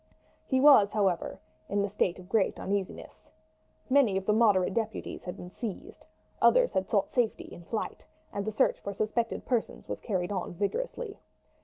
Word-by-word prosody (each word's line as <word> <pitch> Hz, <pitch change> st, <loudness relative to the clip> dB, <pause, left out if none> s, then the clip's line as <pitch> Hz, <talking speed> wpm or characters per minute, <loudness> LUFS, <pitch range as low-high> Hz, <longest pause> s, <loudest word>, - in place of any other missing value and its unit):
He 260 Hz, -, +2 dB
was, 265 Hz, -8 st, +7 dB
however, 195 Hz, -5 st, 0 dB, 0.3 s
in 200 Hz, 0 st, +1 dB
a -, -, -2 dB
state 195 Hz, -3 st, 0 dB
of 180 Hz, -1 st, -12 dB
great 195 Hz, 0 st, +1 dB
uneasiness. 195 Hz, -1 st, -4 dB, 0.6 s
Many 255 Hz, -8 st, +4 dB
of 190 Hz, -, -3 dB
the 210 Hz, -, +3 dB
moderate 210 Hz, -5 st, +4 dB
deputies 225 Hz, -2 st, -3 dB
had 180 Hz, -, -5 dB
been 180 Hz, -, -9 dB
seized, 215 Hz, -1 st, -7 dB, 0.3 s
others -, -, +5 dB
had 190 Hz, 0 st, -1 dB
sought 200 Hz, -3 st, +1 dB
safety 240 Hz, -3 st, 0 dB
in 170 Hz, -, -11 dB
flight, 220 Hz, -, -4 dB, 0.3 s
and 200 Hz, -, -2 dB
the 215 Hz, -, -2 dB
search 215 Hz, -, +2 dB
for 200 Hz, 0 st, -6 dB
suspected 225 Hz, +3 st, -1 dB
persons 240 Hz, -3 st, -2 dB
was -, -, -4 dB
carried 185 Hz, -3 st, -2 dB
on 185 Hz, -4 st, -3 dB
vigorously. 440 Hz, -, -3 dB
205 Hz, 170 wpm, -29 LUFS, 190-235 Hz, 0.6 s, was